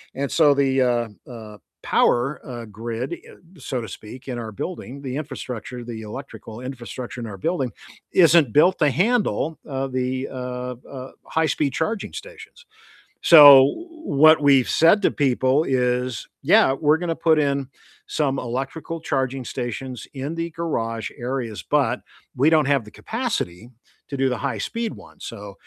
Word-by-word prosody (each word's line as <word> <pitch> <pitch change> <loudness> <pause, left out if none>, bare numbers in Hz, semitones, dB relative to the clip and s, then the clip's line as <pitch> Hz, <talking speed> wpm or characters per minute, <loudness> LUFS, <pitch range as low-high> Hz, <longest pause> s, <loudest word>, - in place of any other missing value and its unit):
And 140 +1 -3
so 150 -3 +5
the, 135 -1 +2
uh 120 -2 +1 0.2
uh, 110 -3 -10 0.3
power, 130 +5 +2
uh, 120 -4 -7
grid, 115 - -5
eh, - - -11 0.3
so 130 -2 -3
to 115 - -7
speak, 125 +5 -11
in 125 -2 -3
our 110 -2 -6
building, 140 - -6
the 130 -1 -4
infrastructure, 125 -4 -6
the 115 -2 -7
electrical 115 -1 -9
infrastructure 125 -1 -7
in 115 - -5
our 100 -3 -8
building, 135 - -1 0.4
isn't 165 - +5
built 180 +5 +4
to 150 -3 +4
handle, 185 - 0
uh, 135 0 -2
the, 130 0 -2
uh 125 -1 -5
uh, 130 -1 -8
high-speed 155 -3 0
charging 200 +9 -2
stations. 480 -1 -11 0.6
So 145 -5 +10 0.4
what 155 - +5
we've 140 -3 +5
said 180 +6 +4
to - - +4
people 130 +1 +2
is, 125 -3 -1
"Yeah, 135 - +5
we're 150 +2 +2
gonna 165 -1 -2
put 160 -1 +3
in 140 -2 0 0.4
some 140 -3 0
electrical 135 +7 -4
charging 135 -3 -2
stations 125 0 -5
in 140 +4 -4
the 165 0 -3
garage 115 -10 -3
areas, 120 -3 -4
but 130 -4 0 0.3
we 135 +4 +4
don't 155 -2 +4
have 140 -3 +2
the 105 - -13
capacity 210 - -4 0.4
to 140 - -4
do 135 0 +2
the 125 -2 -1
high-speed 225 - -3
one, - - -16
so 100 -1 -8
135 Hz, 155 wpm, -22 LUFS, 120-155 Hz, 0.6 s, So